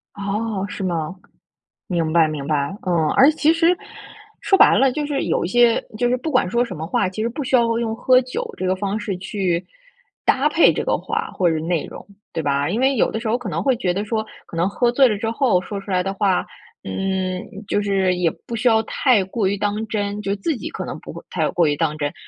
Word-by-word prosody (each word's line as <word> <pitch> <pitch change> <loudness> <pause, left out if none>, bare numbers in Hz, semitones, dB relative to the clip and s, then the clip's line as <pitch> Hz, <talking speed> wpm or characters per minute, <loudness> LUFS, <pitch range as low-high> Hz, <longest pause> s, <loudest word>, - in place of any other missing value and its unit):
哦， 200 0 -2
是 200 - -6
吗？ 175 -1 -2 0.7
明 165 -3 -1
白， 165 -2 +5
明 150 -3 -5
白。 145 -2 0 0.2
嗯， 170 -4 +1
而 270 - +7
且 - - -13
其 315 +1 +4
实， 330 +2 +3 0.7
说 390 - +3
白 - - +7
了， 270 0 +4
就 295 +3 -2
是 290 -2 -1
有 - - 0
一 - - -1
些 240 +3 +4 0.2
就 245 - +1
是 250 - +2
不 285 +6 -4
管 255 -10 +2
说 235 +5 +2
什 210 -7 -6
么 155 - -4
话， 185 +2 0
其 190 +3 -5
实 230 - 0
不 280 +5 -5
需 260 - +2
要 230 -2 +2
用 225 -1 -2
喝 255 +2 +4
酒 250 0 -5
这 185 - -3
个 185 - +2
方 200 +2 -2
式， 205 -4 -3
去 185 -2 -2 0.6
搭 270 +3 +3
配 325 +2 +5
这 - - -2
个 - - +1
话 - - -3
或 180 -2 +1
者 160 - 0
内 165 0 -1
容， - - -10 0.3
对 165 - -2
吧？ 140 0 0
因 210 +6 -1
为 265 +1 +3
有 225 - +2
的 220 - -3
时 225 - -5
候 220 - +2
可 245 -5 -6
能 170 +1 -2
会 260 +2 +3
觉 180 -5 0
得 200 +3 -2
说， 220 0 -2 0.2
可 - - -11
能 170 +3 +1
喝 240 +4 +1
醉 265 +2 +5
了 215 -4 0
之 225 +1 -2
后 230 -6 +2
说 200 +1 -6
出 200 - -13
来 180 -1 +1
的 195 +1 -2
话， 195 -2 +1 0.4
嗯， 185 - -2 0.3
就 205 - +1
是 195 -2 +1
也 180 -2 +1 0.2
不 235 - -5
需 235 +2 0
要 220 -1 +4
太 230 -2 +2
过 195 +2 -1
于 200 +1 0
当 210 +2 -2
真， 205 -1 -2
就 200 -1 -1
自 245 +10 -2
己 - - -6
可 - - -6
能 - - -6
不 - - -10
会 - - -10
太 - - 0
过 175 - +2
于 145 -1 +2
当 155 0 -1
真， 145 -1 -2
200 Hz, 270 characters per minute, -21 LUFS, 180-235 Hz, 0.7 s, 而